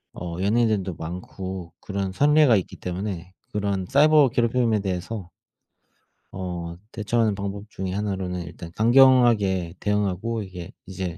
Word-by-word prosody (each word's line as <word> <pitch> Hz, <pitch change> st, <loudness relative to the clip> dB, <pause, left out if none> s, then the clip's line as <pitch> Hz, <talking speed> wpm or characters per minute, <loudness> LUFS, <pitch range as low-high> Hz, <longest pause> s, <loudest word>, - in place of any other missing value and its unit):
어 85 Hz, -1 st, -6 dB
연예인들도 105 Hz, -2 st, +1 dB
많고 90 Hz, +2 st, -7 dB
그런 100 Hz, -1 st, -3 dB
선례가 145 Hz, +1 st, +5 dB
있기 95 Hz, -, -4 dB
때문에 90 Hz, -1 st, -5 dB, 0.2 s
그런 100 Hz, -3 st, -1 dB
사이버 145 Hz, 0 st, +6 dB
괴롭힘에 115 Hz, -1 st, +1 dB
대해서 95 Hz, 0 st, -4 dB, 1.0 s
어 90 Hz, -2 st, -5 dB, 0.2 s
대처하는 110 Hz, -1 st, 0 dB
방법 100 Hz, +1 st, -5 dB
중에 95 Hz, -2 st, -4 dB
1 100 Hz, -1 st, -1 dB
로는 90 Hz, -1 st, -4 dB
일단 85 Hz, 0 st, -9 dB
강경하게 115 Hz, -7 st, +4 dB
대응하고 105 Hz, +2 st, -1 dB
이게 90 Hz, +1 st, -9 dB
이제 90 Hz, -3 st, -5 dB
100 Hz, 295 characters per minute, -24 LUFS, 90-115 Hz, 1.0 s, 사이버